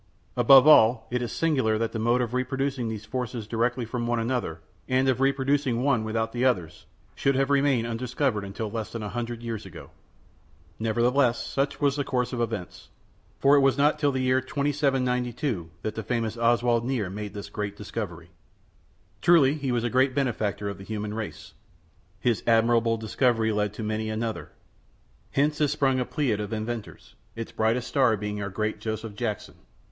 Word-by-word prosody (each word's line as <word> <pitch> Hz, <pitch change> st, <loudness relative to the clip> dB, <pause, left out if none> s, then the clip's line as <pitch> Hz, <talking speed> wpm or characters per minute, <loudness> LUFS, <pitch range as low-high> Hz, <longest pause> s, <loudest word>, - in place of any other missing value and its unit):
Above 135 Hz, +2 st, +7 dB
all, 115 Hz, -6 st, +6 dB
it 125 Hz, 0 st, 0 dB
is 120 Hz, -, -3 dB
singular 130 Hz, -9 st, +1 dB
that 115 Hz, 0 st, -1 dB
the 110 Hz, -, -4 dB
mode 120 Hz, +3 st, +2 dB
of 120 Hz, -1 st, -3 dB
reproducing 130 Hz, 0 st, -1 dB
these 110 Hz, -1 st, -6 dB
forces 125 Hz, -1 st, -4 dB
directly 120 Hz, +3 st, -1 dB
from 120 Hz, +1 st, -3 dB
one 120 Hz, 0 st, +1 dB
another, 115 Hz, -8 st, -2 dB, 0.3 s
and 130 Hz, +1 st, +2 dB
of 130 Hz, 0 st, +1 dB
reproducing 135 Hz, -2 st, +1 dB
one 130 Hz, -5 st, +2 dB
without 110 Hz, +1 st, -1 dB
the 120 Hz, +1 st, -2 dB
others, 90 Hz, -12 st, 0 dB, 0.3 s
should 135 Hz, 0 st, +1 dB
have 135 Hz, +1 st, +1 dB
remained 140 Hz, -4 st, +3 dB
undiscovered 115 Hz, -3 st, -2 dB
till 110 Hz, -2 st, -3 dB
less 110 Hz, -1 st, -4 dB
than 115 Hz, -2 st, -5 dB
a 105 Hz, -, -4 dB
hundred 120 Hz, 0 st, -4 dB
years 115 Hz, -2 st, -4 dB
ago. -, -, -11 dB, 0.9 s
Nevertheless, 120 Hz, +3 st, +2 dB
such 140 Hz, +1 st, -1 dB
was 140 Hz, -1 st, +1 dB
the 145 Hz, -, 0 dB
course 125 Hz, -2 st, -1 dB
of 120 Hz, -, -2 dB
events, 110 Hz, -6 st, -5 dB, 0.5 s
for 140 Hz, +1 st, +5 dB
it -, -, +6 dB
was 135 Hz, -1 st, +3 dB
not 145 Hz, +2 st, +3 dB
till 145 Hz, -1 st, +2 dB
the 130 Hz, -1 st, -1 dB
year 130 Hz, 0 st, +3 dB
2792 130 Hz, -, -1 dB
that 110 Hz, -, -2 dB
the 110 Hz, -, -4 dB
famous 115 Hz, -1 st, -2 dB
Oswald 120 Hz, 0 st, +2 dB
Nier 120 Hz, -7 st, -2 dB
made 105 Hz, 0 st, -6 dB
this 100 Hz, -, -7 dB
great 105 Hz, -1 st, -4 dB
discovery. 90 Hz, -5 st, -6 dB, 0.9 s
Truly 160 Hz, -6 st, +5 dB, 0.2 s
was 120 Hz, -1 st, 0 dB
he -, -, +1 dB
a -, -, -5 dB
great 130 Hz, +1 st, +2 dB
benefactor 110 Hz, -7 st, -1 dB
of 100 Hz, -, -5 dB
the -, -, -9 dB
human 105 Hz, 0 st, -4 dB
race. 110 Hz, -1 st, -6 dB, 0.7 s
His 120 Hz, +1 st, +1 dB
admirable 115 Hz, 0 st, +3 dB
discovery 110 Hz, 0 st, +1 dB
led 105 Hz, -1 st, 0 dB
to 110 Hz, -, -5 dB
many 110 Hz, 0 st, -2 dB
another. 110 Hz, +1 st, -3 dB, 0.8 s
Hence 150 Hz, +2 st, +1 dB
is 150 Hz, -, +3 dB
sprung 135 Hz, -2 st, +1 dB
a 125 Hz, -, 0 dB
pleiad 130 Hz, -9 st, -1 dB
of 105 Hz, -1 st, -4 dB
inventors, 110 Hz, 0 st, -5 dB, 0.2 s
its 115 Hz, -1 st, -6 dB
brightest 115 Hz, +3 st, 0 dB
star 125 Hz, -6 st, +3 dB
being 105 Hz, 0 st, -4 dB
our 100 Hz, -, -3 dB
great 105 Hz, +2 st, -2 dB
Joseph 110 Hz, 0 st, -4 dB
Jackson. 110 Hz, -1 st, -4 dB
120 Hz, 180 wpm, -26 LUFS, 110-130 Hz, 0.9 s, Above